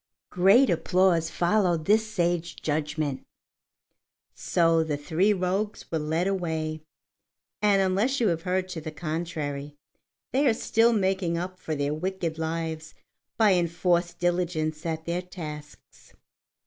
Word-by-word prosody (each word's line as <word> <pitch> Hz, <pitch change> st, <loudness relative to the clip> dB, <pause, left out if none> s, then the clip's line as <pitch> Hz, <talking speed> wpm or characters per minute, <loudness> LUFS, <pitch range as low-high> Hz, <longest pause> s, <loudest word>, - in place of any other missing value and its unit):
Great 195 Hz, +9 st, +5 dB
applause 175 Hz, -2 st, +2 dB
followed 175 Hz, -3 st, +1 dB
this 220 Hz, +3 st, +3 dB
sage 175 Hz, -4 st, -1 dB
judgment. 150 Hz, -2 st, -2 dB, 1.1 s
So 165 Hz, -2 st, +2 dB
the 150 Hz, -2 st, -2 dB
three 165 Hz, +7 st, +1 dB
rogues 195 Hz, +2 st, -1 dB
were 160 Hz, -, 0 dB
led 160 Hz, +3 st, -1 dB
away, 160 Hz, -5 st, -2 dB, 0.8 s
and 200 Hz, -2 st, +4 dB
unless 205 Hz, +9 st, +1 dB
you 230 Hz, -4 st, +3 dB
have 165 Hz, -1 st, -1 dB
heard 185 Hz, +1 st, -1 dB
to 170 Hz, -3 st, -5 dB
the 155 Hz, -, -5 dB
contrary, 155 Hz, -3 st, -4 dB, 0.6 s
they 275 Hz, +2 st, +2 dB
are 230 Hz, -, +3 dB
still 230 Hz, 0 st, +3 dB
making 190 Hz, -5 st, 0 dB
up 185 Hz, +1 st, -5 dB
for 155 Hz, -, -3 dB
their 145 Hz, 0 st, -1 dB
wicked 170 Hz, -1 st, -3 dB
lives 160 Hz, -1 st, -4 dB, 0.4 s
by 215 Hz, -3 st, +5 dB
enforced 175 Hz, 0 st, +1 dB
diligence 175 Hz, -2 st, -1 dB
at 160 Hz, 0 st, -3 dB
their 170 Hz, +1 st, -1 dB
tasks. 155 Hz, -5 st, -10 dB
170 Hz, 130 wpm, -26 LUFS, 160-190 Hz, 1.1 s, Great